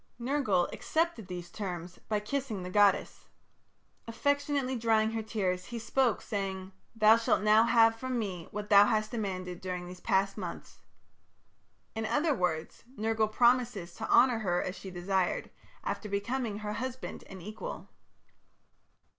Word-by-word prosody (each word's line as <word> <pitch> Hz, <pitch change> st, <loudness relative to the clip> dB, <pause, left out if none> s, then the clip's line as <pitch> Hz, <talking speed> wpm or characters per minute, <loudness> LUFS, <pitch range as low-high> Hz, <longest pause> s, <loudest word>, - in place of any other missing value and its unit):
Nergal 235 Hz, -8 st, +1 dB
accepted 320 Hz, -, -1 dB
these 175 Hz, -2 st, -7 dB
terms 180 Hz, -4 st, -6 dB
by 210 Hz, -1 st, +1 dB
kissing 220 Hz, -3 st, -3 dB
the 180 Hz, -, -6 dB
goddess. 205 Hz, -1 st, +2 dB, 0.8 s
Affectionately 285 Hz, +2 st, 0 dB
drying 220 Hz, -2 st, +2 dB
her 225 Hz, 0 st, -2 dB
tears, 190 Hz, -4 st, -2 dB
he 240 Hz, -, -6 dB
spoke, 235 Hz, +1 st, +1 dB
saying: 190 Hz, -2 st, -4 dB, 0.2 s
"Thou 220 Hz, 0 st, +6 dB
shalt 225 Hz, -3 st, +1 dB
now 215 Hz, +1 st, +6 dB
have 225 Hz, -1 st, +5 dB
from 255 Hz, +2 st, -3 dB
me 185 Hz, -7 st, -4 dB
what 210 Hz, +1 st, -6 dB
thou 200 Hz, 0 st, +9 dB
hast 215 Hz, 0 st, 0 dB
demanded 185 Hz, -6 st, -4 dB
during 180 Hz, -1 st, -4 dB
these 180 Hz, 0 st, -9 dB
past 195 Hz, +3 st, +1 dB
months." 175 Hz, -3 st, -7 dB, 1.1 s
In 220 Hz, 0 st, -3 dB
other 295 Hz, +4 st, +2 dB
words, 170 Hz, -8 st, -2 dB
Nergal 220 Hz, 0 st, +1 dB
promises 235 Hz, -7 st, +2 dB
to 220 Hz, +4 st, -6 dB
honour 245 Hz, -2 st, +5 dB
her 175 Hz, -5 st, 0 dB
as 185 Hz, -, -3 dB
she 195 Hz, -, -8 dB
desired, 185 Hz, 0 st, -1 dB, 0.3 s
after 210 Hz, -, -3 dB
becoming 210 Hz, +2 st, -2 dB
her 210 Hz, 0 st, -4 dB
husband 255 Hz, +4 st, -5 dB
and 190 Hz, -, -9 dB
equal. 215 Hz, -, -7 dB
215 Hz, 145 wpm, -30 LUFS, 190-235 Hz, 1.1 s, thou